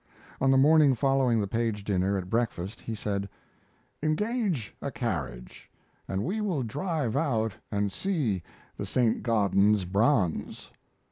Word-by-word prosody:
On 135 - +3
the 135 - +5
morning 145 0 +6
following 130 -2 +2
the 100 - -1
Page 110 -1 -1
dinner 100 0 +1
at 90 -2 -4
breakfast, 110 -3 -2
he 115 - -5
said: 100 -2 -3 0.7
"Engage 180 - -1
a - - -2
carriage - - -5 0.4
and 95 +1 -2
we 215 - -2
will 180 -11 -1
drive 145 - -2
out 115 -8 0 0.2
and 100 -1 0
see 145 - -1 0.4
the - - -3
Saint 120 -3 +1
Gaudens 105 -3 +3
bronze." 100 - 0
115 Hz, 135 wpm, -28 LUFS, 100-145 Hz, 0.7 s, morning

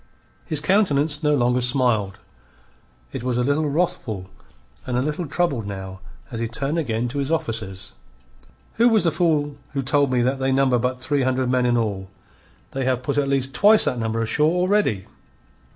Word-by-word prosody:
His 155 - 0
countenance 150 -5 +1
no 150 -1 +2
longer 125 -1 +1
smiled; 120 -6 +1 1.0
it - - -4
was 125 -1 -1
a 125 - +1
little 145 +3 +1
wrathful 140 - -2 0.6
and 125 -1 -1
a - - +1
little 150 +3 -3
troubled 140 - -1
now 95 -1 -7 0.3
as 115 - -5
he 115 - -1
turned 135 +8 -2
again 120 -5 -1
to 140 +4 -4
his 140 0 -2
officers. 110 -10 -3 0.8
"Who 235 +2 +5
was 220 -2 +3
the 165 - +2
fool 150 -5 0 0.2
who 135 -1 -2
told 140 0 +2
me 125 -1 +2
that 130 +2 0
they 135 0 0
number 130 -2 +2
but 125 +1 -2
three 140 +2 -1
hundred 130 -1 0
men 125 -1 +2
in 120 0 +2
all? 100 -4 -2 0.6
They 135 -1 -3
have 130 -1 0
put 140 +2 0
at 140 -1 0
least 135 -1 0
twice 210 +2 +6
that 125 - -1
number 115 0 -1
ashore 150 +7 +2
already." 180 - +1
130 Hz, 185 wpm, -22 LUFS, 120-150 Hz, 1.0 s, twice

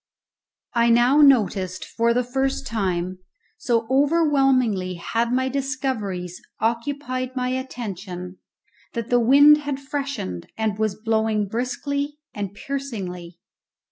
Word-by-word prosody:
I 235 -1 +3
now 240 +4 +5
noticed 200 -9 +3
for 230 0 +1
the 250 +2 +2
first 265 +2 -1
time, 185 -5 -2 0.4
so 235 -2 +1
overwhelmingly 270 - +2
had 230 +7 -1
my 260 +1 +1
discoveries 255 -10 -3 0.2
occupied 255 +2 -2
my 250 -1 -1
attention, 195 -8 -5 0.5
that 235 0 -4
the 245 - +5
wind 285 +5 +7
had 285 -2 -3
freshened 275 - -4
and 220 -2 -1
was 215 -2 0
blowing 220 -1 +1
briskly 280 +6 -3 0.2
and 200 -2 -4
piercingly. 195 -11 -5
235 Hz, 110 wpm, -23 LUFS, 205-270 Hz, 0.5 s, wind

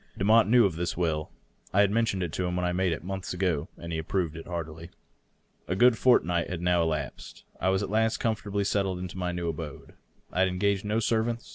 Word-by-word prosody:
Demotte 110 +4 +5
knew 120 0 +6
of 90 -5 -1
this 85 -1 -2
will; 80 -3 -1 0.4
I 100 - +4
had 100 -1 +3
men 115 +2 +2
tioned 95 -5 -1
it 85 -2 -4
to 90 - -1
him 90 - -2
when 90 0 0
I 90 - +1
made 90 0 +1
it, 80 - -3
monlhs 95 -1 -4
ago, 90 -5 0
and 85 0 -7
he 80 - -2
had 80 - -4
approved 85 -5 -1
it 80 - -8
heartily. 85 -1 -6 0.8
A 90 - -1
good 120 +3 +5
fortnight 90 -9 +3
had 90 - -3
now 90 0 +2
elapsed. 75 -4 -4 0.2
I 95 - +1
was 95 +1 +1
at 100 - -4
last 110 +1 +2
comfortably 105 -3 -1
settled 95 -2 0
in 90 0 -5
my 90 -2 -2
new 85 -1 -3
abode. 80 -2 -6 0.4
I - - -2
had 95 - +5
engaged 100 +2 0
no 105 +2 +1
servants. 115 +1 -1
90 Hz, 235 wpm, -28 LUFS, 85-100 Hz, 0.8 s, knew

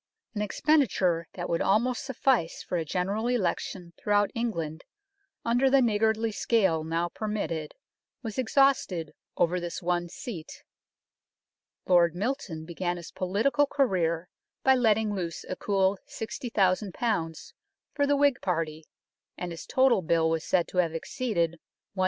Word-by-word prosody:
An 210 - -2
expenditure 205 - +2
that 175 -1 -4
would 170 - 0
almost 230 +5 +2
suffice 265 - 0
for - - -4
a 170 - 0
General 195 +8 -1
Election 185 -5 -2
throughout 205 -1 +2
England 170 -9 -3 0.6
under 245 +3 +3
the 275 +1 +5
niggardly 220 -1 +2
scale 190 -8 +2
now 165 +2 -1
permitted 175 -7 -3 0.5
was 225 +1 -4
exhausted 255 - +2 0.3
over 180 +2 +2
this 175 -1 -4
one 175 0 -1
seat. 170 -5 -8 1.2
Lord 175 -2 +4
Milton 195 - -3
began 175 +1 -2
his 170 - -9
political 225 +11 +1
career 180 - +1 0.4
by 265 - +6
letting 220 -4 +2
loose 175 -4 -4
a 185 - -3
cool 195 -1 +1
60,000 210 -4 -1 1.0
for 285 -1 +1
the 285 0 +3
Whig 285 -3 +3
party, 160 -3 -2 0.5
and 180 -1 -4
his 165 - -8
total 260 -6 +4
bill 160 -1 +2
was 165 -1 -1
said 180 -2 +1
to - - -7
have 165 -2 +1
exceeded 170 -3 -1 0.3
100,000. 195 - -9
190 Hz, 135 wpm, -28 LUFS, 170-230 Hz, 1.2 s, by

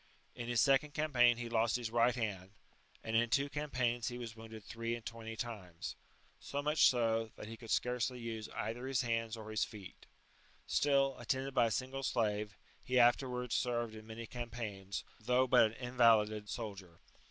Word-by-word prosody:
In 120 - -6
his 120 -1 +1
second 140 +1 +3
campaign 125 -6 +4
he 120 0 -4
lost 115 -1 +2
his 120 -3 -2
right 120 +1 +3
hand; 100 -5 -3 0.5
and 110 - -2
in 120 +1 +3
two 140 +4 +2
campaigns 125 -5 -1
he 120 - -3
was 115 -2 -6
wounded 110 -1 -10
three 115 +2 -3
and 115 - -10
twenty 115 -1 -6
times; 100 -8 -6 0.4
so 140 - -4
much 150 +2 +5
so, 115 -2 +1
that - - -8
he 115 - -7
could 115 0 -12
scarcely 125 +1 0
use 115 -2 -5
either 120 +4 -3
his 135 -1 +1
hands 115 -2 -1
or 110 -1 -8
his 110 - +1
feet; 100 -4 -9 0.6
still, 140 -2 +2
attended 130 +3 -2
by 120 -3 +4
a - - -1
single 130 +4 -2
slave, 105 -5 -1 0.2
he 125 - 0
afterwards 125 0 +3
served 120 -2 0
in 110 0 -11
many 115 +1 -7
campaigns, 110 -5 -5 0.2
though 125 +3 +3
but 120 - +6
an 110 - -2
invalided 115 -4 +3
soldier. 95 -7 -6
115 Hz, 175 wpm, -35 LUFS, 110-125 Hz, 0.6 s, but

